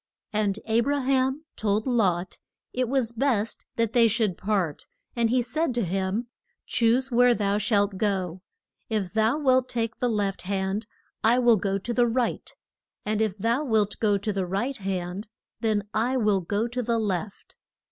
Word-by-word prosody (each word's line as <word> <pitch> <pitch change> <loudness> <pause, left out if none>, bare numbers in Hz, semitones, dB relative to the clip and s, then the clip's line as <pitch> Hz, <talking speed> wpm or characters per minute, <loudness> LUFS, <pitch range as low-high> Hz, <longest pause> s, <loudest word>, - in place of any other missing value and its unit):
And 210 -2 +1
A 225 +1 +2
bra 280 +4 +1
ham 265 +3 +1
told 215 0 0
Lot 195 -8 0 0.3
it 250 -1 0
was 260 -4 +1
best 235 -3 -1
that 230 -1 0
they 235 -2 +6
should 220 -4 +1
part; 190 -7 -2 0.3
and 235 -1 +2
he 250 +1 +2
said 275 +2 -1
to 235 -4 +1
him, 190 +5 -1 0.4
Choose 245 +3 +2
where 245 0 +5
thou 205 -1 0
shalt 205 -2 +1
go. 185 -4 -1 0.5
If 210 -5 -2
thou 220 +5 +2
wilt 260 -3 +2
take 225 -2 -2
the 245 - +1
left 205 -3 -1
hand 195 +2 -2 0.4
I 230 +2 +5
will 240 -3 +5
go 195 0 -1
to 235 +5 -4
the 240 0 +3
right, 235 +1 -1 0.5
and 215 0 0
if 215 -3 0
thou 230 +7 +1
wilt 220 -6 +1
go 205 -2 +3
to 205 +2 -2
the 190 -2 -2
right 220 +9 -2
hand 190 +1 -4 0.3
then 215 -3 0
I 240 +4 +1
will 210 -5 +2
go 205 +6 -1
to 245 +1 -3
the 235 -1 0
left. 200 -2 -3
220 Hz, 175 wpm, -26 LUFS, 200-240 Hz, 0.5 s, they